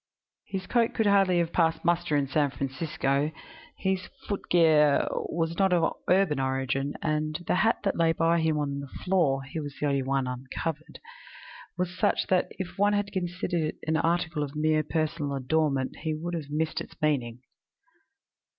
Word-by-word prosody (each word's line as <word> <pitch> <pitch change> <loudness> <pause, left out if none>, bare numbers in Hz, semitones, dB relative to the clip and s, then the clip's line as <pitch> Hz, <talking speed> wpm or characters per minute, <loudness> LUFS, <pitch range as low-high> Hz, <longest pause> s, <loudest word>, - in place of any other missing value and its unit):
His 190 -2 -4
coat 235 +1 +1
would 225 - +2
hardly 195 -3 +4
have 170 -1 0
passed 165 -1 +1
muster 175 -2 +2
in 140 -1 +1
San 145 +1 +1
Francisco: 140 +2 -1 0.5
his 190 -1 -1 0.2
footgear 160 -7 +3 0.2
was 165 0 -1
not 190 -1 +4
of 165 -2 +2 0.2
urban 180 -6 +3
origin, 135 +1 -1
and 155 -1 -1
the - - +1
hat 225 +5 +3
that 195 - 0
lay 165 -1 +3
by 165 +1 +2
him 160 -1 +1
on 140 -1 -2
the 140 - -6
floor 145 -5 0
(he 140 +4 -6
was 145 -2 -6
the - - -1
only 140 -1 +1
one 135 0 0
uncovered) 135 +5 -5 0.8
was 180 0 -2
such 185 - +1
that 185 -1 +3
if 190 0 -6
one 205 +1 +4
had 205 -1 0
considered 175 -2 -2
it 155 0 -2
as - - -5
an 160 - +2
article 165 -1 0
of 145 0 -4
mere 155 0 +2
personal 155 -2 -2
adornment 135 0 0
he 155 -1 -2
would 170 +3 -5
have 155 -4 -4
missed 155 +2 -1
its - - -11
meaning. 125 -5 -1
155 Hz, 175 wpm, -27 LUFS, 140-175 Hz, 0.8 s, hardly